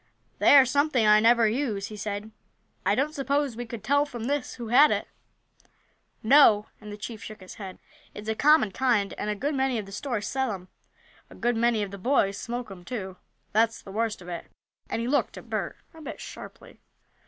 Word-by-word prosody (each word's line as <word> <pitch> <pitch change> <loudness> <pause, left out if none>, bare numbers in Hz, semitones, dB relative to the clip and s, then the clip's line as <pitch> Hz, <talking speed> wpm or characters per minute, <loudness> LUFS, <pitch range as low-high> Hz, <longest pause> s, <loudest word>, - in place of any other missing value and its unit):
"They 205 - +6
are 270 - +8
something 275 -2 +2
I 210 0 +7
never 230 +1 +5
use," 215 -4 -2
he 215 - -8
said. 210 +1 -5 0.6
"I 200 - +4
don't 285 +5 0
suppose 280 -3 -1
we 240 +1 -6
could 225 -2 -7
tell, 285 +5 +3
from 245 -6 -7
this, 280 +2 -2
who 235 -3 -7
had 280 +6 +7
it?" - - -1 1.2
"No," 220 -4 +6 0.2
and 210 -1 -9
the 205 - -7
chief 215 0 -7
shook 215 - -9
his 185 -1 -11
head. 190 -2 -7 0.4
"It's 210 +1 -8
a 220 - +1
common 290 -3 +4
kind, 225 -3 +1
and 210 - -2
a 210 - -1
good 285 +8 -2
many 265 -2 0
of 215 - -4
the 195 - -12
stores 230 0 -3
sell 265 -3 -1
'em. 185 -1 -9 0.6
A - - -14
good 240 +1 0
many 230 -2 +2
of 200 - -6
the 200 - -8
boys 200 -3 +1
smoke 240 -2 -5
'em, 180 -2 -10
too 190 -5 -6 0.3
that's 225 +2 +2
the 195 - -12
worst 220 -2 -2
of - - -13
it," 175 -1 -6 0.4
and 230 - -2
he - - -2
looked 285 +3 0
at - - -12
Bert - - -3 0.2
a 320 - -13
bit 305 - -7
sharply. - - -11
230 Hz, 210 wpm, -26 LUFS, 205-265 Hz, 1.2 s, are